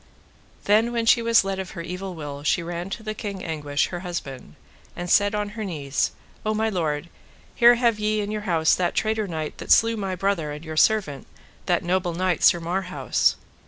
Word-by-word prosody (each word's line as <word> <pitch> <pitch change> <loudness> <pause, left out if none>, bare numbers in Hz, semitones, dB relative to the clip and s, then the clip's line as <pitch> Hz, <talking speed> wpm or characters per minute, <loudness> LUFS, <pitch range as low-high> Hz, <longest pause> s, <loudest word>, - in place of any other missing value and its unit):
Then 220 +3 +3
when 235 -1 -1
she 235 +1 +5
was 230 -2 +4
let 195 0 -3
of 190 -1 -7
her 170 - -4
evil 180 +2 -6
will 145 -3 -7
she 170 +4 +1
ran 175 +2 -5
to 220 +3 -6
the 215 0 -3
King 200 -3 -6
Anguish, 145 -3 -1
her 175 - -5
husband, 140 - -6 0.4
and 175 - -5
said 205 +3 +3
on 210 -1 -2
her 215 +1 -6
knees: 145 -8 -1 0.3
O 215 0 0
my 220 +1 +1
lord, 160 -4 -2 0.5
here 240 0 +6
have 235 -3 +1
ye 215 0 0
in 205 0 -4
your 215 0 -3
house 160 -2 +3
that 180 -1 0
traitor 220 -1 0
knight 160 -3 -5
that - - -4
slew 230 0 +5
my 195 -3 -3
brother 180 -5 -1
and 150 +2 -8
your 155 0 -6
servant, 155 -5 +2 0.4
that - - +1
noble 175 -1 0
knight, 185 0 0
Sir 175 - +5
Marhaus. 180 +2 0
185 Hz, 200 wpm, -24 LUFS, 165-215 Hz, 0.5 s, here